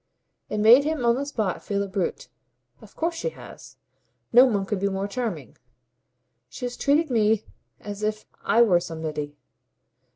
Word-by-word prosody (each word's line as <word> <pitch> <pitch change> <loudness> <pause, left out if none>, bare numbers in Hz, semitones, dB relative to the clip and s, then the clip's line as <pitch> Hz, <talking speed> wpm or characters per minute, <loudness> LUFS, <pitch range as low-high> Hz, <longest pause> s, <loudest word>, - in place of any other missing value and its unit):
It - - -3
made 230 +6 +7
him 305 -4 -1
on 235 - +5
the 275 +3 -3
spot 215 -10 -2
feel 200 -1 -2
a - - -5
brute. 195 - -3 0.5
"Of - - -16
course 335 +1 -1
she 335 +9 -3
has. - - -13 0.6
No 250 +2 +9
one 200 -5 0
could 200 0 -2
be 200 +1 0
more 195 +1 -2
charming. 205 - -5 0.9
She 250 - -6
has 245 0 -4
treated 290 +1 +1
me 220 -2 +2 0.4
as 205 0 -7
if 215 0 -2 0.2
I 235 - +5
were 185 -7 +4
somebody. 155 -3 -5
215 Hz, 165 wpm, -25 LUFS, 195-250 Hz, 0.9 s, No